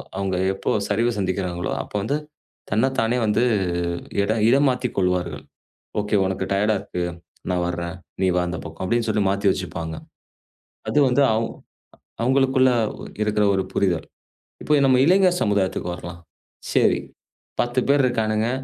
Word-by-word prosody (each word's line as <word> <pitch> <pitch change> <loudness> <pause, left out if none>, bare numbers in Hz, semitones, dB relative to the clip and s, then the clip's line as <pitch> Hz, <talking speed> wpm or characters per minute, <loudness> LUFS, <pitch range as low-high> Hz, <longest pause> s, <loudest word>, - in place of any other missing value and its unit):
அவங்க 95 -1 -1 0.2
எப்போ 95 - -4 0.2
சரிவு 115 +4 +1
சந்திக்கிறங்களோ 90 -2 -2
அப்ப - - -12
வந்து 140 +9 0 0.5
தன்ன 110 +7 +2
தானே 115 +2 +1
வந்து 110 +2 +2 0.8
இடம் 110 +2 0
இடம் 140 +3 +4
மாத்தி 125 0 -1
கொள்வார்கள். 90 -2 0 0.6
ஓகே. 105 +1 0
"உனக்கு 95 0 -2
டயர்டா 105 +2 +2
இருக்கு. 90 -3 -4 0.5
நான் 90 -1 0
வர்றேன். 85 0 -4 0.3
நீ 95 - +3
வா 90 - +3
அந்தப் 90 +1 -5
பக்கம்." 80 +2 -7
அப்படின்னு 110 0 +1
மாத்தி 100 +1 0
வெச்சுருப்பாங்க. 85 -3 -4 0.9
அது - - +2
வந்து 130 +3 +3 1.0
அவங்களுக்குள்ள 130 0 +3 0.5
இருக்கிற 105 0 +1
ஒரு 95 - 0
புரிதல். 90 -5 +1 0.6
இப்போ 150 - +2
நம்ம 130 -1 +4
இளைஞர் 180 0 +4
சமுதாயத்துக்கு 95 -4 0
வரலாம். 85 0 -9 0.5
சரி - - +3 0.6
10 120 +1 0
பேர் 140 -1 +4
இருக்கானுங்க. 110 -2 0
105 Hz, 130 wpm, -23 LUFS, 90-120 Hz, 1.0 s, இடம்